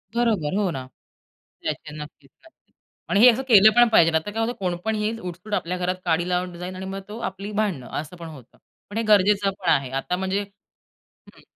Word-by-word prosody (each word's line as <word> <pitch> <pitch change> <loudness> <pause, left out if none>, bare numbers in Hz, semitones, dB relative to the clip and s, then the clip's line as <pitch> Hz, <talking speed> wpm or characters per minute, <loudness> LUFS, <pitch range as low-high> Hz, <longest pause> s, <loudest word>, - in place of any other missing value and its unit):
बरोबर, 210 -9 +1
हो, 205 -3 +1
ना, 130 -3 -5 0.8
त्याचे 150 -1 -4
नक्कीच, 150 -2 -11 0.2
नक्कीच 330 - -24 0.4
आणि 200 - +2
हे 245 +3 +9
असं 260 +4 -3
केलं 215 -3 +8
पण 240 0 +7
पाहिजे 165 -6 +5
नाही 160 0 +1
तर 205 - -5
काय 225 - -2
होतं, 240 - -2
कोण 180 -2 -1
पण 220 0 0
येईल 215 +2 -2
उठसूट 180 +2 -8
आपल्या 180 -1 -1
घरात 180 +1 -1
काडी 170 +1 +1
लावून 180 -1 -2
जाईल 180 +1 -6
आणि 185 +1 -6
मग 195 +1 -5
तो 220 - -7
आपली 195 +2 -8
भांडणं, 200 -12 -2
असं 155 +4 -8
पण 170 -1 -8
होतं. 135 -6 -13 0.3
पण 205 - -6
हे 230 - 0
गरजेचं 205 -1 +4
पण 180 - -1
आहे, 135 -4 +2
आता 135 +7 -2
म्हणजे 190 +2 -1 0.7
हं. - - -22
190 Hz, 215 wpm, -23 LUFS, 170-210 Hz, 0.8 s, हे